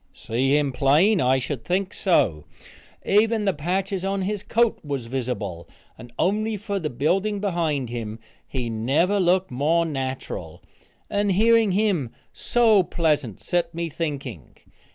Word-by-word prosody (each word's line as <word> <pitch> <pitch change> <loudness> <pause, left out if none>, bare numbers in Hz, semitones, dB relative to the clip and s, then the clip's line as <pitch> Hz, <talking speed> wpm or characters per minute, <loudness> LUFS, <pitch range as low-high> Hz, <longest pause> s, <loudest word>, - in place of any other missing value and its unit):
See 135 +5 +1
him 145 -2 0
plain! 160 - +3
I 130 +1 +3
should 130 -1 -4
think 185 +1 -1
so. 90 - +1 0.6
Even 215 +1 +3
the 195 - +2
patches 185 +5 -2
on 195 0 -1
his 205 +1 -2
coat 230 +2 +1
was 140 -5 -4
visible, 115 -9 -4 0.3
and 120 +1 -12
only 215 +4 0
for 200 0 -3
the 155 -4 -3
building 190 - 0
behind 165 - -1
him, 115 -2 -5 0.3
he 125 -3 -3
never 135 - +1
looked 185 -1 +2
more 155 +6 +1
natural, 135 -4 -5 0.4
and 205 -1 0
hearing 225 0 +4
him 190 - +1 0.2
so 225 -4 +3
pleasant, 150 - -1
set 170 -1 -1
me 170 0 -2
thinking. 140 - -5
170 Hz, 140 wpm, -24 LUFS, 130-195 Hz, 0.6 s, hearing